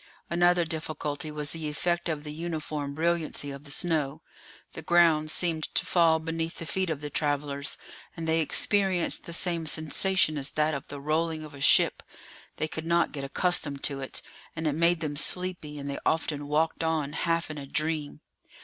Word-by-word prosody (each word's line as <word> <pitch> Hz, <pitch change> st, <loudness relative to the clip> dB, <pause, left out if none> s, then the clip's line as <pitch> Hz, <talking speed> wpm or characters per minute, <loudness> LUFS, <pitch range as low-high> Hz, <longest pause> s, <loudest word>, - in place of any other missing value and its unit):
Another 175 Hz, 0 st, +4 dB
difficulty 155 Hz, -1 st, -3 dB
was 150 Hz, -1 st, -2 dB
the 160 Hz, -2 st, -4 dB
effect 170 Hz, +3 st, -1 dB
of 150 Hz, -2 st, -2 dB
the 150 Hz, -1 st, -6 dB
uniform 155 Hz, -3 st, -4 dB
brilliancy 160 Hz, -3 st, -1 dB
of 140 Hz, +1 st, -9 dB
the -, -, -6 dB
snow; 155 Hz, -1 st, 0 dB, 0.5 s
the -, -, -6 dB
ground 160 Hz, -2 st, +4 dB
seemed 160 Hz, -1 st, 0 dB
to -, -, +2 dB
fall 165 Hz, -2 st, +4 dB
beneath 165 Hz, +1 st, -3 dB
the 165 Hz, -, -6 dB
feet 185 Hz, +4 st, -1 dB
of 150 Hz, -3 st, -2 dB
the 150 Hz, 0 st, -5 dB
travellers, 145 Hz, -1 st, -1 dB, 0.4 s
and 165 Hz, 0 st, -4 dB
they 160 Hz, 0 st, +3 dB
experienced 190 Hz, +2 st, +1 dB
the -, -, -7 dB
same 170 Hz, -2 st, -1 dB
sensation 155 Hz, +1 st, +2 dB
as 140 Hz, +1 st, -1 dB
that 155 Hz, +1 st, +1 dB
of 140 Hz, -, -5 dB
the 145 Hz, -, -7 dB
rolling 155 Hz, +2 st, 0 dB
of 155 Hz, -1 st, -10 dB
a 140 Hz, -, -10 dB
ship; -, -, +5 dB, 0.6 s
they 155 Hz, -, -1 dB
could 160 Hz, +1 st, -6 dB
not 170 Hz, 0 st, +3 dB
get 140 Hz, -2 st, -5 dB
accustomed 145 Hz, -1 st, +1 dB
to 140 Hz, -2 st, +1 dB
it, 135 Hz, -, -6 dB, 0.3 s
and 160 Hz, 0 st, -4 dB
it 150 Hz, -, +2 dB
made 170 Hz, +2 st, +3 dB
them 150 Hz, -2 st, -2 dB
sleepy, 175 Hz, -2 st, +2 dB
and 140 Hz, 0 st, -6 dB
they 140 Hz, -, -3 dB
often 150 Hz, -3 st, 0 dB
walked 160 Hz, +2 st, +1 dB
on 155 Hz, -3 st, 0 dB
half 165 Hz, 0 st, 0 dB
in 150 Hz, -, -6 dB
a 140 Hz, -, -8 dB
dream. 155 Hz, 0 st, -2 dB
155 Hz, 185 wpm, -28 LUFS, 150-165 Hz, 0.6 s, ship